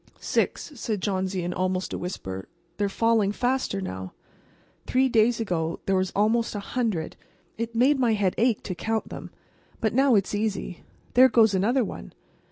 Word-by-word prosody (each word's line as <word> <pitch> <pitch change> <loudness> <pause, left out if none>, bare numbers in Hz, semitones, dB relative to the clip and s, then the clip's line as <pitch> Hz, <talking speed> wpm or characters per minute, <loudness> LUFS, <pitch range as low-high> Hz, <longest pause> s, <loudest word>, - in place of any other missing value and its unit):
"Six," - - -1
said 225 -5 -3
Johnsy, 190 -1 -1
in 175 +1 -2
almost 185 0 -1
a - - -2
whisper. 95 - -6 0.3
"They're 205 -1 0
falling 225 -1 +2
faster 245 -3 -1
now. 95 - -6 0.7
Three 260 +1 +3
days 230 -1 +3
ago 170 -6 -2
there 195 - +2
were 185 0 +2
almost 225 +3 +2
a - - -2
hundred. 200 -6 -2 0.4
It 230 +1 -4
made 265 +4 +4
my 240 -3 +3
head 200 -4 +1
ache 235 -2 +2
to 185 - -4
count 220 +4 -2
them. - - -8 0.5
But 220 - 0
now 265 0 +4
it's 195 -1 +1
easy. 205 -4 -2 0.3
There 260 +1 +7
goes 225 -4 +5
another 230 +7 +2
one. - - -7
210 Hz, 170 wpm, -26 LUFS, 185-235 Hz, 0.7 s, There